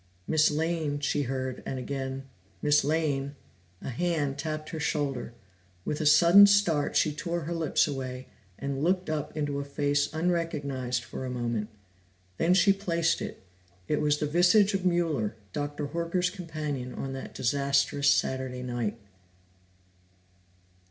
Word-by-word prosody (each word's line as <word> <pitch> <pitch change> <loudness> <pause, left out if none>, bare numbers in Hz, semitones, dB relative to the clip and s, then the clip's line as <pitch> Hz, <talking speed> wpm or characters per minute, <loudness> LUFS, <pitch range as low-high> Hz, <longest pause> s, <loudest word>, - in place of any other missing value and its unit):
"Miss 155 -1 +4
Lane," 155 -1 -1
she 145 0 0
heard, 130 -1 -3
and 135 - -4
again, 135 +1 -4 0.4
"Miss 150 0 +3
Lane." 145 -2 0 0.5
A - - -4
hand 145 -1 -1
tapped 155 0 -4
her 160 - -5
shoulder; 140 -5 -2 0.5
with 150 - -2
a 155 - +2
sudden 175 +6 +8
start, 190 -8 +2
she 150 - +3
tore 170 +3 -3
her 165 +3 -4
lips 165 -2 +2
away, 130 -2 -5 0.3
and 140 0 -3
looked 180 -1 +1
up 155 0 -3
into 145 -2 -1
a - - -2
face 145 0 0
unrecognized 150 -7 -1
for 130 - -7
a 130 - -4
moment. 120 -3 -2 0.7
Then 175 +2 +3
she 195 +1 +5
placed 170 -4 0
it. - - -6 0.4
It 150 - 0
was 150 0 +2
the 150 - -1
visage 180 +7 +4
of 190 -1 +1
Mueller, 160 -12 0 0.2
Dr. 145 0 -3
Horker's 170 +2 -1
companion 155 -8 -5
on 135 0 -4
that 135 - -7
disastrous 140 +2 +2
Saturday 130 -2 0
night. 120 -3 -2
145 Hz, 145 wpm, -28 LUFS, 135-165 Hz, 0.7 s, sudden